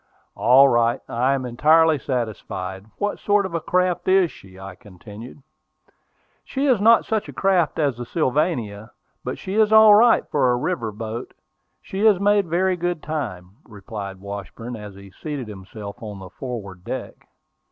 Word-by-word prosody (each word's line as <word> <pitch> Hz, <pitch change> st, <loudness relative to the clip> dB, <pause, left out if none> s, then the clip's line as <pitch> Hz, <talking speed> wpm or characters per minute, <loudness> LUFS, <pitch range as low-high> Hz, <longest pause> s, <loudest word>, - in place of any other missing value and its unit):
"All 135 Hz, +3 st, +6 dB
right; 120 Hz, -2 st, +2 dB
I 130 Hz, +4 st, +1 dB
am 130 Hz, -2 st, -4 dB
entirely 155 Hz, +5 st, +4 dB
satisfied. 105 Hz, -6 st, -4 dB
What 205 Hz, 0 st, -2 dB
sort 205 Hz, -1 st, +2 dB
of 190 Hz, -, -6 dB
a 170 Hz, -, -1 dB
craft 180 Hz, 0 st, 0 dB
is 185 Hz, -2 st, +4 dB
she?" 95 Hz, -1 st, -15 dB
I 95 Hz, 0 st, -8 dB
continued. 105 Hz, -, -13 dB, 1.0 s
"She 275 Hz, +1 st, -2 dB
is 250 Hz, -7 st, +3 dB
not 230 Hz, +1 st, +5 dB
such 220 Hz, -2 st, -2 dB
a -, -, -9 dB
craft 185 Hz, -5 st, +1 dB
as 140 Hz, -6 st, 0 dB
the 120 Hz, -, -6 dB
Sylvania, 125 Hz, -, -1 dB, 0.3 s
but 125 Hz, -, -4 dB
she 190 Hz, -, -6 dB
is 215 Hz, 0 st, +3 dB
all 220 Hz, -1 st, +8 dB
right 230 Hz, +3 st, +5 dB
for 140 Hz, -4 st, +2 dB
a 120 Hz, -, +1 dB
river 125 Hz, -6 st, -2 dB
boat. 110 Hz, +3 st, -7 dB, 0.5 s
She 190 Hz, -, -6 dB
has 210 Hz, -4 st, +5 dB
made 205 Hz, -1 st, +2 dB
very 180 Hz, +2 st, +1 dB
good 175 Hz, -2 st, -2 dB
time," 105 Hz, -, -5 dB
replied 100 Hz, -3 st, -8 dB
Washburn, 100 Hz, +4 st, -7 dB
as 105 Hz, -3 st, -9 dB
he 100 Hz, 0 st, -13 dB
seated 145 Hz, -, -6 dB
himself 100 Hz, 0 st, -9 dB
on 105 Hz, -3 st, -7 dB
the 95 Hz, -2 st, -11 dB
forward 100 Hz, -7 st, -7 dB
deck. -, -, -7 dB
125 Hz, 165 wpm, -22 LUFS, -, 1.0 s, all